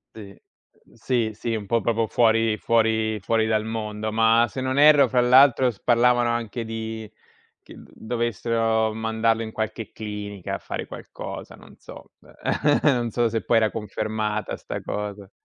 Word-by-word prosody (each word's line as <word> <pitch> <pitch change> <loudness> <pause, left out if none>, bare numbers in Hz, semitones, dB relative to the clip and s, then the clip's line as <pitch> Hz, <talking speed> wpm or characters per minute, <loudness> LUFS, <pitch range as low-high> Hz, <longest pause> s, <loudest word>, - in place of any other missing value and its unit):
Sì, 100 -3 -12 0.5
sì, 115 -1 -1
sì, 115 +2 -3
un 105 -2 -5
po' 115 +2 0
proprio 115 -1 0
fuori 115 -1 +2
fuori 110 -1 +1
fuori 110 +3 0
dal 110 0 0
mondo, 110 -1 -4
ma 115 +1 +4
se 130 +5 -6
non 130 +2 -1
erro 150 -1 +6
fra 125 - +2
l'altro 130 +1 +5
s 105 - -10
parlavano 120 0 +3
anche 115 0 -3
di 110 -1 -6 0.5
che - - -15
dovessero 115 -1 -1
mandarlo 110 0 0
in 110 - -7
qualche 110 0 -4
clinica, 105 -3 -6
a - - -1
fare - - -6
qualcosa, - - -9
non - - -17
so, - - -13 0.7
non 125 -6 +2
so 120 +1 +1
se 115 0 -2
poi 115 - +2
era 110 -1 +3
confermata 105 0 -3
'sta - - -7
cosa. 100 -1 -5
110 Hz, 155 wpm, -24 LUFS, 110-120 Hz, 0.7 s, erro